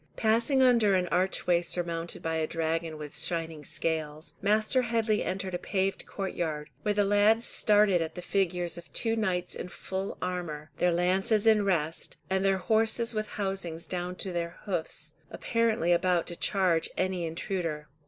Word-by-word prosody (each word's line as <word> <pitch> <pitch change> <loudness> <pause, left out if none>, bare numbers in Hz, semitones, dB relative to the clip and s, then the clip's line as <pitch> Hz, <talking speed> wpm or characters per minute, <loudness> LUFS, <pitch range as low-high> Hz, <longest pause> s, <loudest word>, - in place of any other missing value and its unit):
Passing 235 +5 +3
under 230 -6 +5
an 180 -1 +1
archway 180 -1 +2
surmounted 170 -1 -3
by 160 0 -1
a 160 -1 0
dragon 165 0 -2
with 150 -1 -8
shining 165 -1 -3
scales, 155 0 -3
Master 215 +5 +3
Headley 225 -3 +1
entered 190 0 -3
a 175 - -1
paved 195 -1 -1
courtyard, 165 -6 -3
where 210 -1 0
the 205 - +3
lads 205 +3 +4
started 205 -4 +3
at 160 -1 -4
the 180 - -6
figures 180 -3 0
of 170 - -15
two 225 -1 +1
knights 185 -5 0
in - - -5
full 190 +2 -5
armour, 170 -5 -4
their 180 - +3
lances 190 +5 +2
in 215 -2 +5
rest, 165 -4 -1
and 190 0 +2
their 195 -1 +3
horses 225 +4 +2
with 215 -1 -2
housings 190 -5 -3
down 180 0 -3
to 190 - -4
their 170 -1 -3
hoofs, 180 -6 -3 0.2
apparently 225 -7 +1
about 175 0 +2
to 175 - -6
charge 180 -4 +2
any 185 -1 0
intruder. 165 -3 -3
180 Hz, 165 wpm, -29 LUFS, 165-205 Hz, 0.2 s, under